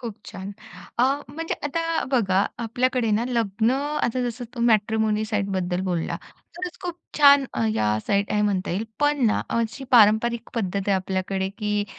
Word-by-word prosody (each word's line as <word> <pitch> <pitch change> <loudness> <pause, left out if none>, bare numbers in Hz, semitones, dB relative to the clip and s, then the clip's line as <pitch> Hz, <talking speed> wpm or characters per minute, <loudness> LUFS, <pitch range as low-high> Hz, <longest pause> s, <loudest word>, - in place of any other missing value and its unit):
खूप 230 -5 -6
छान! 195 +1 -7 0.5
अ, - - +4 0.3
म्हणजे 325 +3 -4
आता 330 +3 -1
बघा, 200 -6 +2
आपल्याकडे 245 0 0
ना 220 +3 +2
लग्न, 225 -2 +1
आता 270 -2 -1
जसं 240 +1 -6
तो 235 - -5
मॅट्रिमोनी 220 -1 +2
साइटबद्दल 195 -4 -1
बोलला, 175 -3 -1 0.4
तरच 360 -1 -5
खूप 350 -1 -4 0.2
छान 280 -1 +7 0.3
या 105 0 +1
साइट 200 0 +1
आहेत 210 0 +2
म्हणता 195 -3 0
येईल. 200 +6 -1 0.2
पण 290 -3 +2
ना 215 - +2 0.2
अशी 230 +4 -3
पारंपरिक 230 0 +4
पद्धत 200 -4 -1
आहे 200 - +4
आपल्याकडे 190 0 -1
की 210 -1 0
220 Hz, 155 wpm, -24 LUFS, 200-255 Hz, 0.5 s, छान